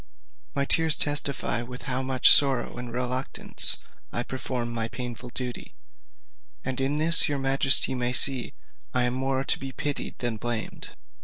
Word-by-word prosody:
My 140 0 -1
tears 160 +1 +1
testify 145 -4 -2
with 125 +1 -10
how 130 -1 -3
much 130 -1 +4
sorrow 135 -4 +3
and 120 -1 -7
reluctance 125 +2 +3 0.3
I 120 - -3
perform 125 -2 -5
this 115 -1 -4
painful 125 -1 -8
duty; 125 0 -8 0.9
and 130 0 -4
in 135 +2 -1
this 160 +1 +2
your 145 - -2
majesty 135 0 +5
may 125 -1 -2
see 130 -1 +3 0.4
I 125 - +1
am 125 0 -1
more 135 +1 -2
to - - -1
be 135 0 -7
pitied 145 +1 -5
than 120 -3 -4
blamed. 115 0 -6
130 Hz, 155 wpm, -25 LUFS, 120-135 Hz, 0.9 s, majesty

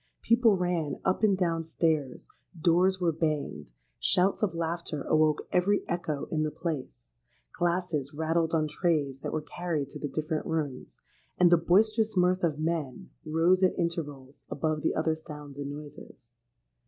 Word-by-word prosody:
People 230 -3 +4
ran 175 -5 -1
up 190 +1 +1
and 205 -3 +4
down 165 -3 0
stairs; 155 -5 -1 0.3
doors 180 +3 +3
were 175 -2 +2
banged; 150 - -2 0.3
shouts 185 +2 +2
of 195 -6 0
laughter 165 -3 -3
awoke 155 -1 +2
every 195 +3 +2
echo 155 -5 -2
in 155 - 0
the 155 - +1
place; 145 -6 -5 0.4
glasses 175 -5 -1
rattled 160 +2 0
on 155 -1 +1
trays 150 -4 0
that - - -4
were 155 - -2
carried 155 -3 -3
to 150 - -9
the 145 - -3
different 155 +2 -2
rooms; 150 -6 -3 0.4
and 175 -1 +5
the - - +9
boisterous 215 +5 +2
mirth 180 +1 +3
of 155 -4 +1
men 155 -5 -3 0.2
rose 165 +4 +3
at 185 - +3
intervals 145 -6 -4
above 155 +1 -1
the - - 0
other 160 0 +1
sounds 150 -3 -10
and 140 0 -4
noises. 145 +1 -9
160 Hz, 155 wpm, -29 LUFS, 150-180 Hz, 0.4 s, the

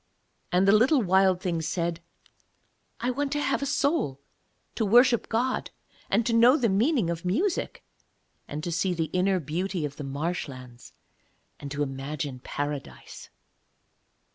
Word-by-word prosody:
And 185 +2 +3
the - - +7
little 245 +5 +4
Wild 190 -1 +3
Thing 170 -3 -1
said: 170 +1 -2 1.0
'I 245 +2 0
want 280 +2 -2
to 295 - 0
have 275 -1 0
a 280 - -1
soul 285 - 0 0.5
to 225 - -1
worship 240 +3 +4
God, 245 +3 -1 0.4
and 215 +3 +2
to 235 - 0
know 240 +5 +6
the 235 -6 +1
meaning 215 - +2
of 170 -1 -5
music, 335 - -1 0.6
and 150 +1 -6
to 175 - -3
see 180 +2 0
the 165 -2 -2
inner 185 +1 +2
beauty 170 +3 -2
of 145 0 -7
the 145 - -6
marshlands 135 -4 -5 0.7
and 140 - -7
to 145 +1 -2
imagine 135 0 -5
Paradise.' 145 - -6
180 Hz, 145 wpm, -27 LUFS, 150-235 Hz, 1.0 s, the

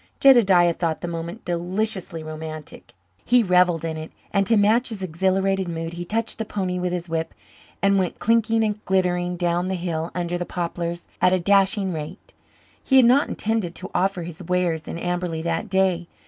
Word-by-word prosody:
Jedediah 195 -10 +6
thought 165 -2 -2
the 175 - -4
moment 170 +4 -6
deliciously 180 -1 -2
romantic. 155 -1 -8 0.3
He 245 0 +4
revelled 180 -3 +3
in 160 -1 -3
it 155 0 -7 0.2
and, 195 -2 +2
to 225 - +4
match 220 +5 +3
his 210 -4 -5
exhilarated 190 +2 0
mood, 165 0 -4
he 175 +1 -6
touched 225 +5 -2
the - - 0
pony 185 -3 -2
with 180 0 -1
his 175 -1 -3
whip 165 0 -3 0.5
and 200 0 +4
went 185 -2 -2
clinking 225 0 +2
and 210 -1 -2
glittering 180 -1 0
down 175 +1 0
the 190 - -1
hill 170 -2 -3
under 175 0 -2
the - - -1
poplars 170 0 -4
at 180 +1 +4
a 185 - +3
dashing 195 +1 +2
rate. 155 +5 -8 0.5
He 265 - +1
had 260 - +7
not 260 +5 +4
intended 215 -6 -1
to 185 - -7
offer 190 -2 0
his 165 -1 -8
wares 175 -2 -1
in - - -5
Amberley 175 -2 -2
that 170 +5 -2
day. 185 -2 +1
180 Hz, 185 wpm, -23 LUFS, 170-195 Hz, 0.5 s, had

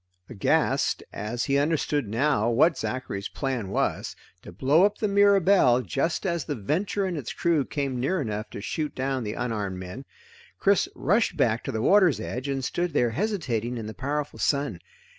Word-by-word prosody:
Aghast, 105 -6 +1
as 110 +4 -3
he 140 0 +2
understood 145 -3 0
now 115 0 +1
what 145 +7 +4
Zachary's 115 -7 -4
plan 130 -8 -3
was - - -1 0.3
to - - -11
blow 135 - +3
up 205 +1 +2
the 215 - 0
Mirabelle 200 -10 +4
just 140 - -1
as 170 -4 0
the 145 - -3
Venture 180 - -1
and 185 -2 -2
its 140 -6 -5
crew 165 -4 +1
came 135 -3 -3
near 180 +9 0
enough 110 -5 -3
to - - -7
shoot 150 +7 -3
down 130 -1 -1
the 105 -1 -3
unarmed 105 -6 -3
men 95 +9 -8 0.5
Chris 200 -1 +2
rushed 205 -2 +1
back 115 -5 +1
to - - -2
the 110 0 -2
water's 185 - +5
edge 125 +4 -4
and 135 -2 -2
stood 175 -1 -2
there 120 -1 +2
hesitating 125 - -2
in 115 - -5
the 110 - -6
powerful 145 +3 -3
sun. 140 -1 0
135 Hz, 180 wpm, -26 LUFS, 115-170 Hz, 0.5 s, water's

